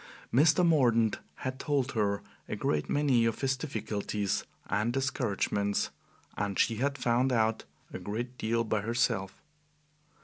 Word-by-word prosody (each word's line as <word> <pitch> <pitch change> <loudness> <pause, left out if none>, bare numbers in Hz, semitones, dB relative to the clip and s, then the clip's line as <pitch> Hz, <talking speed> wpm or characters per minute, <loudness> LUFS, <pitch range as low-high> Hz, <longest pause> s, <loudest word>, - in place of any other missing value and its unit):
Mr. 155 +7 +5
Mordaunt 120 -9 +3 0.2
had 130 0 -5
told 140 -3 0
her 100 -2 0 0.3
a - - -2
great 75 -1 -1
many 135 -5 +3
of 115 -1 -1
his 135 -1 +2
difficulties 105 -7 -2 0.2
and 105 +4 +1
discouragements, 100 -6 0 0.4
and 100 -2 -2
she 115 - +2
had 140 +4 0
found 125 +1 +2
out 110 -2 +1 0.3
a - - -4
great 120 +5 -4
deal 115 +1 +1
by 110 -2 0
herself. 100 -4 -1
115 Hz, 135 wpm, -30 LUFS, 105-130 Hz, 0.4 s, Mr